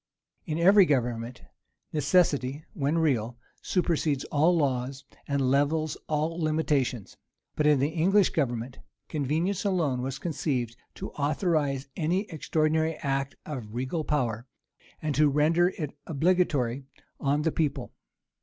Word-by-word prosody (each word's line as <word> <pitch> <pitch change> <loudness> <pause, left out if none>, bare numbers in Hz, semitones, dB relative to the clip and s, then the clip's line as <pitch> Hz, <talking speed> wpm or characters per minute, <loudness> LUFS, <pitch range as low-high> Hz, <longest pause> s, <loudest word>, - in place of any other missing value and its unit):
In 155 -1 -2
every 190 +2 +6
government, 120 -3 -1 0.5
necessity, 145 -2 +2
when 150 -3 0
real, 125 -7 +1 0.2
supersedes 160 -6 0
all 160 +4 +3
laws, 135 -1 -1 0.2
and 140 -2 +1
levels 150 +2 +1
all 155 +2 -1
limitations; 150 -8 0 0.4
but 150 - +2
in 150 -1 +5
the 140 +3 +1
English 180 +5 +3
government, 125 -4 -2 0.3
convenience 160 +6 -1
alone 165 -11 0
was 135 +1 -3
conceived 135 -7 -2 0.2
to - - -6
authorize 145 -2 0
any 175 +3 +1
extraordinary 160 0 0
act 135 -1 -1
of 120 -8 -6
regal 130 +6 -2
power, 120 -6 -1 0.6
and 155 -1 0
to 150 +1 +4
render 160 +5 +3
it 150 -4 -4
obligatory 140 -6 +1 0.3
on 145 +2 +1
the 160 - +1
people. 140 -6 -2
150 Hz, 125 wpm, -27 LUFS, 135-160 Hz, 0.6 s, every